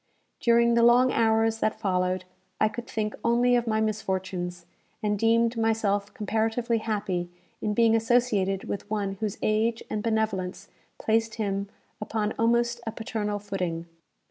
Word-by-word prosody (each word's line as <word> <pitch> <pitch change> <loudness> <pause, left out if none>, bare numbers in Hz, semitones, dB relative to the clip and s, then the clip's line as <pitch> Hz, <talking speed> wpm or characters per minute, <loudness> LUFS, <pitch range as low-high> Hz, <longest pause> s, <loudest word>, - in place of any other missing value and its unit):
During 235 0 +4
the 235 - +4
long 245 +2 +6
hours 225 0 +2
that 215 - 0
followed, 185 -1 0 0.3
I 215 - +4
could 240 +2 -7
think 215 -1 -2
only 240 +1 +3
of 240 -1 +1
my 220 -1 +1
misfortunes, 190 -5 -2 0.4
and 210 -1 0
deemed 230 +1 +3
myself 215 -3 +1
comparatively 225 +2 0
happy 200 -5 -2 0.3
in 210 -1 -1
being 230 0 +4
associated 225 -5 +2
with 200 - -5
one 200 -2 -2
whose 215 -3 -2
age 225 +2 +1
and 215 - -1
benevolence 220 -5 -1 0.3
placed 225 0 0
him 200 -2 -2 0.3
upon 215 -1 -1
almost 235 +1 +2
a - - 0
paternal 215 -2 -3
footing. 185 -5 -3
220 Hz, 145 wpm, -27 LUFS, 200-230 Hz, 0.4 s, long